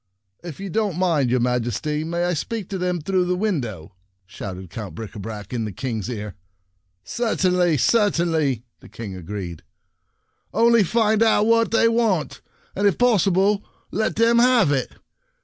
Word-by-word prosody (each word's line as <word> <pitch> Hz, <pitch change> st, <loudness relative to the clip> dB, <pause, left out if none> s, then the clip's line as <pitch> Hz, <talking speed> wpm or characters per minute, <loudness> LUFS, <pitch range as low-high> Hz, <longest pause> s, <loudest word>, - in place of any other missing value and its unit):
"If 170 Hz, -2 st, -8 dB
you 195 Hz, -1 st, -6 dB
don't 205 Hz, -3 st, -1 dB
mind, 165 Hz, -8 st, +2 dB
your 125 Hz, +1 st, +2 dB
Majesty, 125 Hz, +5 st, -1 dB
may 170 Hz, +2 st, -2 dB
I 175 Hz, 0 st, +1 dB
speak 210 Hz, +5 st, -4 dB
to 195 Hz, -2 st, -4 dB
them 180 Hz, -2 st, -1 dB
through 185 Hz, +3 st, +1 dB
the 180 Hz, 0 st, 0 dB
window? 120 Hz, -, -3 dB, 0.2 s
" 95 Hz, 0 st, -48 dB
shouted 95 Hz, -1 st, -8 dB
Count 105 Hz, -4 st, -7 dB
Bricabrac 105 Hz, -1 st, -7 dB
in 120 Hz, -2 st, -1 dB
the 105 Hz, -, -4 dB
King's 110 Hz, 0 st, -4 dB
ear. 105 Hz, -4 st, -5 dB, 0.4 s
" 90 Hz, -, -46 dB, 0.2 s
Certainly, 180 Hz, -, +1 dB
certainly," 160 Hz, -, +1 dB, 0.2 s
the -, -, -15 dB
King 110 Hz, -4 st, -7 dB
agreed. 90 Hz, -2 st, -6 dB, 0.5 s
" -, -, -47 dB
Only 235 Hz, -1 st, +5 dB
find 220 Hz, +2 st, +2 dB
out 220 Hz, -2 st, +4 dB
what 230 Hz, 0 st, +3 dB
they 230 Hz, 0 st, +3 dB
want, 225 Hz, -, 0 dB, 0.3 s
and 200 Hz, +2 st, +2 dB
if 200 Hz, -, +1 dB
possible, 200 Hz, -3 st, +3 dB, 0.3 s
let 220 Hz, 0 st, -1 dB
them 230 Hz, +1 st, +4 dB
have 245 Hz, -, +4 dB
it. 135 Hz, -3 st, -1 dB
170 Hz, 165 wpm, -22 LUFS, -, 0.5 s, Only